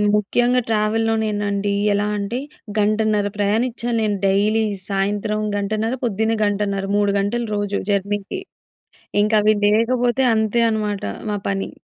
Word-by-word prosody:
ముఖ్యంగా 245 Hz, +4 st, +2 dB
ట్రావెల్లోనేనండి. 215 Hz, -2 st, 0 dB, 0.2 s
ఎలా 205 Hz, +1 st, 0 dB
అంటే, 205 Hz, +5 st, -3 dB, 0.4 s
గంటన్నర 210 Hz, 0 st, +2 dB
ప్రయాణిచ్చాలి 230 Hz, +3 st, 0 dB
నేను 205 Hz, -2 st, 0 dB
డైలీ. 210 Hz, +3 st, +2 dB, 0.3 s
సాయంత్రం 205 Hz, +2 st, -1 dB, 0.2 s
గంటన్నర, 215 Hz, +3 st, -1 dB
పొద్దున్నే 220 Hz, 0 st, 0 dB
గంటన్నర. 200 Hz, -1 st, -1 dB
3 205 Hz, -1 st, +2 dB
గంటలు 230 Hz, +4 st, -1 dB
రోజు 205 Hz, -1 st, -1 dB
జర్నీకి. 205 Hz, -, -1 dB, 0.8 s
ఇంక 210 Hz, +1 st, +1 dB
అవి 215 Hz, +1 st, +4 dB
లేకపోతే 240 Hz, +4 st, +2 dB
అంతే 220 Hz, +1 st, +1 dB
అనమాట 210 Hz, -2 st, -2 dB, 0.3 s
మా 205 Hz, -, -1 dB
పని. 195 Hz, 0 st, -2 dB
210 Hz, 115 wpm, -21 LUFS, 205-225 Hz, 0.8 s, అవి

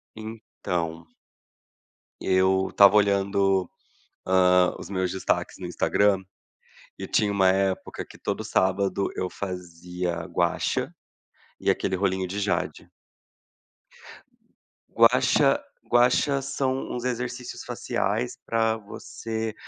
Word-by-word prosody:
Então 90 Hz, -7 st, -5 dB, 1.1 s
eu 95 Hz, 0 st, +2 dB
tava 100 Hz, 0 st, +8 dB
olhando, 100 Hz, -2 st, +2 dB, 0.6 s
hã, 90 Hz, -1 st, +4 dB
os -, -, -9 dB
meus 95 Hz, -2 st, -1 dB
destaques 95 Hz, -, -1 dB
no -, -, -6 dB
Instagram, 100 Hz, -2 st, +2 dB, 0.8 s
e -, -, -4 dB
tinha 105 Hz, -1 st, +1 dB
uma 95 Hz, -2 st, +3 dB
época 95 Hz, 0 st, -1 dB
que -, -, -14 dB
todo -, -, -3 dB
sábado 95 Hz, +1 st, +1 dB
eu 90 Hz, -, -2 dB
fazia 90 Hz, -2 st, -5 dB
Gua 85 Hz, -2 st, 0 dB
Sha, -, -, -1 dB, 0.7 s
e -, -, +1 dB
aquele 95 Hz, -, +1 dB
rolinho 95 Hz, 0 st, 0 dB
de 100 Hz, +3 st, -4 dB
jade 100 Hz, 0 st, -2 dB, 2.0 s
Gua -, -, +5 dB
Sha, -, -, +3 dB, 0.2 s
Gua 120 Hz, +1 st, +4 dB
Sha 140 Hz, +2 st, +1 dB
são 135 Hz, -1 st, -2 dB
uns 120 Hz, -, -4 dB
exercícios 125 Hz, 0 st, -4 dB
faciais 110 Hz, +5 st, -2 dB
pra 110 Hz, -1 st, +1 dB
você, 110 Hz, +1 st, -6 dB
95 Hz, 110 wpm, -25 LUFS, 95-110 Hz, 2.0 s, tava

